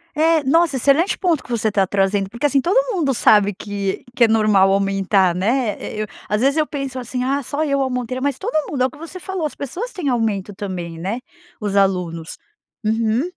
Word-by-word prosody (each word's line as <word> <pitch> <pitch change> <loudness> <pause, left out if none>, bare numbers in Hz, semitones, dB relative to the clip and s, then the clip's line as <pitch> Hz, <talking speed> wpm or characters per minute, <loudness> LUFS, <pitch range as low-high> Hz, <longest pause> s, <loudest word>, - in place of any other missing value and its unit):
É, 320 0 +3
nossa, 325 +2 +3
excelente 285 - +2
ponto 340 -7 +1
que - - -17
você 220 -2 0
tá 195 -2 +2
trazendo. 195 0 +1
Porque, 235 +7 -4
assim, 275 -1 +3
todo - - +2
mundo 285 -7 +1
sabe 205 -2 +4
que 200 0 -4
que 240 - +5
é - - +2
normal 215 -3 +4
aumentar, 195 -1 +2
né. 220 +5 0
E 215 - -5
eu - - -1 0.2
às 210 +1 +1
vezes 275 +2 +3
eu 310 -1 +2
penso 275 -3 -4
assim: 250 +1 -3
"Ah, 275 +2 0
só 285 +4 -2
eu 280 -2 +1
aumentei", 255 -1 -2
mas 280 -2 0
todo - - -4 0.2
mundo 260 -3 0
é - - +4
o 260 - -2
que 295 - -14
você 330 +3 -9
falou, 380 -1 -4
as 300 - -4
pessoas 375 - -5
têm 330 -8 -3
aumento 215 -5 -1
também, 175 -4 -6
né? 200 +8 -3 0.4
Os 205 -2 -3
alunos. 180 -4 0 0.5
Uhum. 225 +3 +1
235 Hz, 210 wpm, -20 LUFS, 200-285 Hz, 0.5 s, que